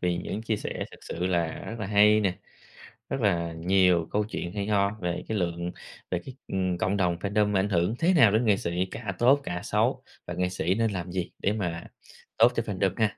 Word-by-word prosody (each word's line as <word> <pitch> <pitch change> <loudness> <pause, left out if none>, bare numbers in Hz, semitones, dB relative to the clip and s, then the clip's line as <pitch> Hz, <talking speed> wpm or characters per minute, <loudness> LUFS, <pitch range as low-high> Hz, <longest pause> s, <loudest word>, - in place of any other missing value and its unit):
vì 90 -1 0
những 105 +5 -4
chia 110 -2 -1
sẻ - - -4
thật - - -13
sự 90 +2 -4
là 85 -3 0
rất 115 - -6
là 110 - -3
hay 105 +1 +5
nè, 95 -3 0 0.7
rất 135 - -2
là 85 -5 +1
nhiều 90 0 +3
câu 105 0 +1
chuyện 85 -4 -4
hay 100 0 -3
ho 100 -1 +2
về 90 0 -2
cái 110 - -1
lượng 85 -1 -2 0.4
về 90 - 0
cái, 130 - -9
ừm, 95 -2 -1
cộng 95 +3 0
đồng 90 -3 +1
fandom 105 +2 +1
ảnh 95 +2 +2
hưởng 90 +3 +1
thế 180 +3 +3
nào 115 - +6
đến 110 +3 +2
nghệ 105 -3 +4
sĩ, 90 +2 -1
cả 105 -5 -4
tốt 130 +4 +5
cả 90 -5 -4
xấu - - 0 0.2
và 90 - -5
nghệ 90 +1 0
sĩ 90 0 0
nên 115 -1 +1
làm 90 -2 -4
gì 90 -1 -3
để 100 - +1
mà 85 -5 -3 0.5
tốt 115 +2 +6
cho 115 - 0
fandom 95 -3 0
ha. 110 -2 +1
95 Hz, 230 wpm, -27 LUFS, 90-105 Hz, 0.7 s, nào